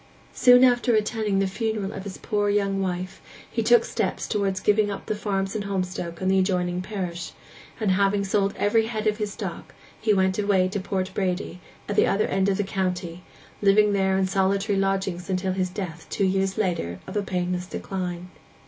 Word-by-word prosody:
Soon 250 0 +6
after 245 -1 +4
attending 215 -1 0
the 195 - +2
funeral 210 0 -2
of 195 - -7
his 195 -2 -6
poor 205 -2 0
young 200 -1 +1
wife 185 0 -3 0.3
he - - 0
took 475 -1 +5
steps - - -2
towards 195 -2 0
giving 210 +1 +3
up 200 - -5
the - - -1
farms 200 -1 -2
in 215 - -1
Holmstoke 185 -3 -3
and 190 0 +1
the 190 - +4
adjoining 180 -1 0
parish, 180 -4 -5 0.5
and, 210 -4 +1
having 200 +1 +2
sold 195 0 0
every 220 +2 +2
head 220 -2 -3
of 210 -1 +2
his 210 -2 -3
stock, - - -7 0.3
he 215 - +2
went 190 -1 +2
away 200 -3 +3
to 200 +2 -2
Port 190 -1 -2
Bredy, 180 -2 -2 0.3
at 205 - -2
the - - +4
other 205 - +2
end 190 +1 +1
of 195 - +1
the 205 - +1
county, 180 -3 -3 0.4
living 205 +1 +5
there 190 -1 +2
in 190 - +2
solitary 195 +2 +1
lodgings 195 -2 -1
till 185 0 -1
his 185 -1 -1
death 180 -4 -6
two 200 - 0
years 190 0 0
later 170 - -1
of - - -8
a 205 - +2
painless 180 -1 -2
decline. 180 -2 -5
195 Hz, 195 wpm, -25 LUFS, 185-205 Hz, 0.5 s, Soon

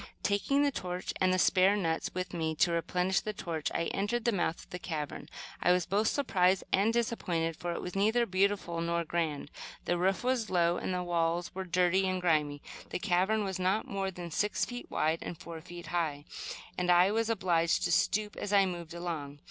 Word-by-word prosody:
Taking 240 +8 +2
the 285 - +3
torch 180 -6 -4
and 185 0 +4
the 185 - +2
spare 185 +2 +4
nuts 165 -5 -1
with 185 0 -3
which 160 -2 -2
to 175 - +3
replenish 180 +2 +1
the 215 - -4
torch, 165 -6 -3
I 165 - 0
entered 215 +4 -1
the 235 - +4
mouth 175 -4 -1
of - - -20
the 180 - -5
cavern. 155 -5 -5 0.3
I 180 - +4
was 180 -1 +3
both 205 +4 +1
surprised 190 -10 +2
and 205 +4 +4
disappointed, 180 -9 -1
for 175 +2 -3
it - - -5
was 180 - -6
neither 220 +5 +3
beautiful 190 -3 0
nor 170 0 0
grand. 160 -3 -2 0.3
The 175 0 0
roof 190 +4 +1
was 250 -4 0
low, 175 -1 +2
and - - -3
the 180 0 -1
walls 170 0 0
were 190 0 -4
dirty 180 +1 +2
and 185 0 0
grimy. 150 -5 +1 0.3
The - - -2
cavern 195 +3 +1
was 190 -2 -3
not 190 +4 +1
more 195 -1 -2
than 175 -2 -7
six 210 +6 +1
feet 245 0 -7
wide 160 +1 +1
and 170 - -6
four 165 -1 -8
feet 175 +1 -10
high, 155 -4 -2 0.5
and 180 0 0
I 180 +2 +6
was 225 +1 0
obliged 175 -6 +2
to 175 - +1
stoop 210 +4 +1
as 205 - -4
I 200 -1 +5
moved 175 -2 -5
along. 155 -5 -5
180 Hz, 205 wpm, -31 LUFS, 170-200 Hz, 0.5 s, I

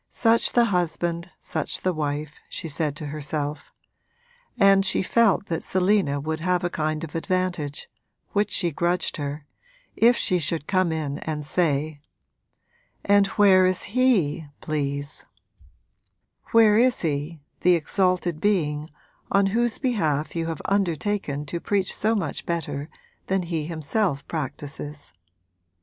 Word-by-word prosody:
Such 230 0 +3
the 240 -1 +5
husband 175 -3 -1
such - - -2
the 185 - 0
wife, 150 -1 -3
she 170 - -4
said 150 -1 -1
to 155 - -6
herself; 150 0 -4 0.9
and 195 -1 +6
she 190 0 +3
felt 225 -1 +3
that 165 -4 -3
Selina 185 -6 +1
would 155 +2 -3
have 180 +1 0
a 175 - -1
kind 155 0 -2
of 160 - -7
advantage, 175 -4 -2 0.4
which 205 0 +1
she 175 -3 +1
grudged 175 +4 0
her, 145 0 -5 0.5
if 235 +2 +5
she 180 - +1
should 160 -1 -2
come 185 -2 +1
in 150 -3 -3
and 150 -2 -4
say: 150 -2 0 1.0
'And 200 0 +5
where 190 -2 +6
is 185 -1 +1
he, 180 - +2
please 145 -1 -3 1.2
where 220 -2 +6
is 250 +1 +3
he, 150 0 -2 0.2
the 180 0 +4
exalted 180 -1 0
being 155 -7 0 0.4
on 200 0 +4
whose 240 0 +1
behalf 160 - -1
you 165 -1 -1
have 165 -2 -5
undertaken 190 -5 -1
to 170 +4 -4
preach 195 +1 0
so 220 +2 +1
much 175 -9 -3
better 150 -3 -3 0.4
than 190 -1 +1
he 165 -3 -3
himself 160 -2 -1
practises?' 145 - -5
170 Hz, 135 wpm, -24 LUFS, 150-195 Hz, 1.2 s, and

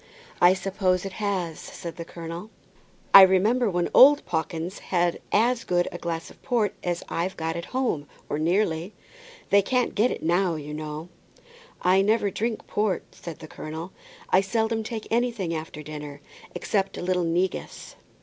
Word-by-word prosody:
"I 180 +1 +7
suppose 190 -1 0
it 195 - -4
has," 185 -6 -2
said 170 0 -8
the 170 - -6
colonel. 170 +4 -7 0.6
"I 195 - +13
remember 205 +6 +4
when 175 -2 0
old 285 +3 +8
Pawkins 165 +2 -3
had 175 -2 0
as 235 +3 +2
good 175 -1 +1
a 175 - -7
glass 165 -1 -4
of - - -19
port 225 -5 0
as 175 -1 -2
I've 175 +3 -2
got 160 0 -2
at 170 0 -4
home, 240 - -1 0.2
or 145 - -2
nearly. 170 +1 0 0.6
They 200 - +6
can't 250 +5 0
get 220 +4 +3
it - - -5
now, 175 +1 +2
you 150 -1 -6
know." 155 +2 -6 0.7
"I 185 +2 +5
never 205 0 +2
drink 225 +3 -2
port," 210 -2 0
said 170 -3 -8
the 155 - -10
colonel. 160 +4 -7 0.4
"I 185 - +6
seldom 220 +3 0
take 220 0 -5
anything 230 -7 0
after 155 -1 -6
dinner, 150 -1 -8 0.4
except 195 -3 -1
a - - -5
little 180 0 +1
negus." 175 +3 -2
180 Hz, 165 wpm, -25 LUFS, 165-210 Hz, 0.7 s, I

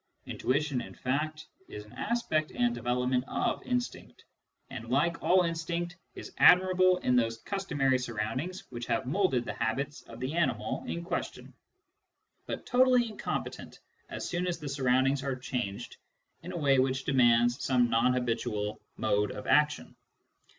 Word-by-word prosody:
Intuition, 140 -1 -1
in - - -10
fact, 155 +4 -2 0.2
is 105 0 -8
an 105 - -17
aspect 160 -10 -1
and 245 -1 +1
development 125 - 0
of - - -1
instinct, 245 -1 -4 0.5
and, 115 -3 -7
like 160 +6 +1
all 185 0 +4
instinct, 170 +1 -3 0.2
is - - -9
admirable 185 0 +6
in 125 - +2
those 115 -2 +1
customary 145 - 0
surroundings 125 - -3
which 120 -1 -6
have 130 - 0
moulded 135 -5 +1
the - - -4
habits 140 +6 -2
of - - -10
the 130 +4 -3
animal 165 -5 -1
in 170 - -3
question, 170 - -5 0.9
but - - -5
totally 250 -1 +4
incompetent 210 - -5 0.3
as - - -5
soon 180 +1 -2
as 175 -2 -1
the 150 -3 -7
surroundings 135 0 +2
are 135 -1 -2
changed 125 -6 -4 0.4
in 180 - -7
a 180 - -4
way 140 -4 +3
which 130 0 +1
demands 120 -1 +3
some 125 -2 +3
non 120 +2 +2
habitual 115 -4 -2 0.2
mode 105 0 +1
of - - -7
action. 150 0 +2
135 Hz, 150 wpm, -30 LUFS, 125-170 Hz, 0.9 s, admirable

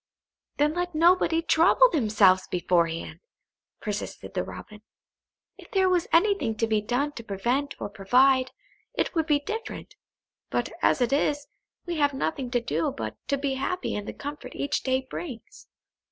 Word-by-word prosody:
"Then 295 +1 +2
let 355 -1 -3
nobody 330 0 +4
trouble 340 +10 +5
themselves 210 - +3
beforehand," 170 -2 0 0.6
persisted 210 -1 -5
the - - -1
Robin. 210 -1 -10 0.8
"If - - -14
there 380 -1 +2
was 360 -2 +1
anything 345 - +3
to 225 - +1
be 220 -1 +1
done 250 +7 -1
to 240 -5 -9
prevent 240 +8 -1
or - - -3
provide, 255 +6 +3 0.5
it - - -1
would 325 -3 0
be 295 -2 +3
different. 445 +7 -6 0.6
But - - -1
as - - +3
it 245 +2 +2
is, 290 0 +1 0.4
we 345 -2 -3
have 285 -2 +2
nothing 265 -2 -2
to 245 0 +1
do 165 -9 -1
but 110 -1 -5
to 280 - +1
be 275 -1 -1
happy 275 +8 -2
in 205 - -4
the - - -6
comfort 290 +1 -8
each 285 +1 -1
day 260 0 0
brings." 260 -5 -8
270 Hz, 160 wpm, -26 LUFS, 215-320 Hz, 0.8 s, trouble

